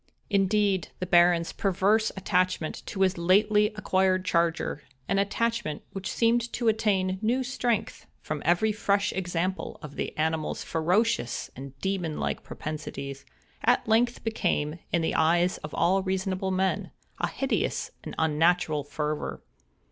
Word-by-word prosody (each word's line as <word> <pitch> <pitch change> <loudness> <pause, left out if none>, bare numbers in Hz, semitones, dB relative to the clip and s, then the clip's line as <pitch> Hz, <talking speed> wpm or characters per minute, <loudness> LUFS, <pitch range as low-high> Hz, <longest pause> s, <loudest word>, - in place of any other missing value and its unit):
Indeed, 200 -2 +2
the 185 - -3
Baron's 175 -1 +4
perverse 200 +3 +2
attachment 185 -3 0
to 195 - -4
his 185 -2 +2
lately 210 +4 +4
acquired 190 -2 +1
charger—an 165 -3 -1
attachment 220 -5 -1
which 195 -1 -4
seemed 235 +1 +2
to 235 -2 +2
attain 190 -4 +1
new 240 +4 +1
strength 245 -4 -2
from 150 -1 -4
every 175 +7 +3
fresh 200 -1 +1
example 185 +4 -2
of 145 -1 -9
the - - -4
animal's 160 0 -1
ferocious 170 - 0
and 135 +1 -9
demon 180 -5 -2
like - - -2
propensities—at 140 - -4
length 240 +2 +2
became, 165 -8 -1
in 170 -2 +1
the - - 0
eyes 175 +3 +3
of 150 - -7
all 185 +3 +3
reasonable 190 0 -1
men, 190 0 0 0.3
a - - +1
hideous 270 0 -1
and - - -7
unnatural 160 -1 +2
fervor. 145 - -3
185 Hz, 130 wpm, -27 LUFS, 160-210 Hz, 0.3 s, Baron's